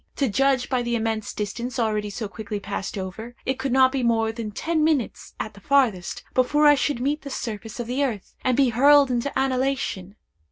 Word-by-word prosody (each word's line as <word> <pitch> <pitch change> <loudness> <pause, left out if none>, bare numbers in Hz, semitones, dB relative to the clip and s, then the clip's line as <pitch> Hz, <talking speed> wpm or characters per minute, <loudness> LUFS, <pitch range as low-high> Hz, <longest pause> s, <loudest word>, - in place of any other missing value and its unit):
To 275 - +1
judge 255 +3 +2
by 255 -2 0
the 240 0 -1
immense 220 -1 -2
distance 235 +5 -4
already 215 -3 0
so 210 +2 -4
quickly 205 0 -6
passed 200 0 -5
over, 210 +6 -6
it 265 0 -1
could 265 0 -2
not 260 0 +5
be 270 -1 -1
more 225 -2 +2
than 225 -1 -5
ten 315 +9 -1
minutes, 305 -7 -1
at 220 - -4
the 200 - -15
farthest, 230 -9 +1
before 295 +4 +3
I 295 - +8
should 285 -2 0
meet 285 +4 -1
the 280 - -8
surface 225 -3 -5
of 240 - -2
the 255 +4 -1
earth, 225 -8 -3
and 255 -2 +1
be 275 -2 +4
hurled 280 +3 +5
into 245 +3 -1
annihilation! 260 -7 -1
245 Hz, 205 wpm, -24 LUFS, 220-270 Hz, -, I